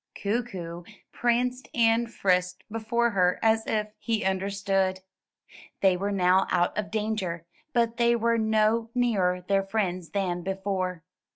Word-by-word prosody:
Kookoo 190 -6 -3 0.3
pranced 250 +2 0
and 230 -1 +3
frisked 180 -2 0
before 230 +2 0
her 180 -3 +2
as 220 0 +2
if 215 -1 0
he 225 -4 -1
understood. 190 0 0 0.8
They 190 -2 +4
were 200 +3 -2
now 185 -1 +3
out 175 - +1
of 210 -1 -2
danger, 210 -6 -2 0.3
but 235 -2 +1
they 235 0 +4
were 230 0 +1
no 220 +1 +2
nearer 195 -7 +1
their 195 +2 +1
friends 190 -4 -2
than 180 -1 -1
before. 190 -2 -3
200 Hz, 130 wpm, -27 LUFS, 185-225 Hz, 0.8 s, They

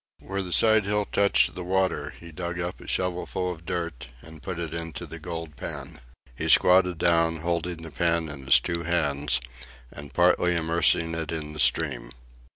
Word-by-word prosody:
Where 95 0 -4
the 90 -2 -6
side 110 +1 +5
hill 105 +1 0
touched 100 0 +2
the 90 - -6
water 90 -5 0
he 85 0 -11
dug 85 +2 -5
up 90 +1 -4
a - - -12
shovelful 90 0 -2
of 85 -1 -10
dirt 85 -9 -4 0.2
and 80 -1 -13
put 90 +3 -5
it 85 -2 -5
into 85 -1 -6
the - - -9
gold 80 -3 -7
pan. - - -8 0.3
He - - -3
squatted 90 -1 +5
down, 85 -1 +2
holding 85 0 -2
the 80 - -9
pan 85 +1 0
in 70 -3 -9
his 70 - +6
two 85 -1 -3
hands, 75 -5 0 0.5
and 70 -1 -10
partly 90 +2 +3
immersing 85 0 +2
it 80 -2 -4
in 75 -2 -5
the 75 - -9
stream. 65 0 +2
85 Hz, 180 wpm, -26 LUFS, 80-90 Hz, 0.5 s, his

